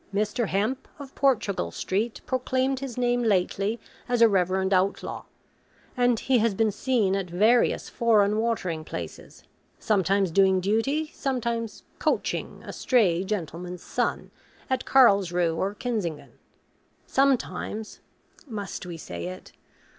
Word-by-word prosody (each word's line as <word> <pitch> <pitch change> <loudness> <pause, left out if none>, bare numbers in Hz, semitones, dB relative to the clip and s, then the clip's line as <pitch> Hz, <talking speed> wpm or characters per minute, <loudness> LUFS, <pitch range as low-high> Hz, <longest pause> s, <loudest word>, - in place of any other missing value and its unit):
Mr. 210 +3 0
Hemp, 215 +8 -1
of 275 -2 -10
Portugal 215 - +1
Street, 205 - -2
proclaimed 260 +1 0
his 265 -3 -6
name 245 0 +1
lately 205 +1 +1 0.3
as 245 -1 +1
a - - +9
reverend 190 -1 +1
outlaw; 190 +2 0 0.7
and 245 -2 +2
he 260 -2 +3
has 220 -2 +1
been 220 +1 +2
seen 210 -3 +1
at 195 -2 -3
various 215 +8 +3
foreign 215 -2 +3
watering 185 -9 -1
places; - - -8 0.3
sometimes 195 -2 +1
doing 190 +1 +4
duty; 245 - 0
sometimes 235 -4 -3 0.2
'coaching' - - -1
a - - -7
stray 190 -9 +2
gentleman's 180 -2 -5
son - - -2 0.4
at 260 -1 0
Carlsruhe 185 -9 +4
or 195 +4 -2
Kissingen; 205 -11 -3 0.7
sometimes 255 -5 0 0.5
must 205 -6 -6
we 170 -2 -6
say 85 - -6
it? 90 - -9
210 Hz, 125 wpm, -26 LUFS, 190-245 Hz, 0.7 s, a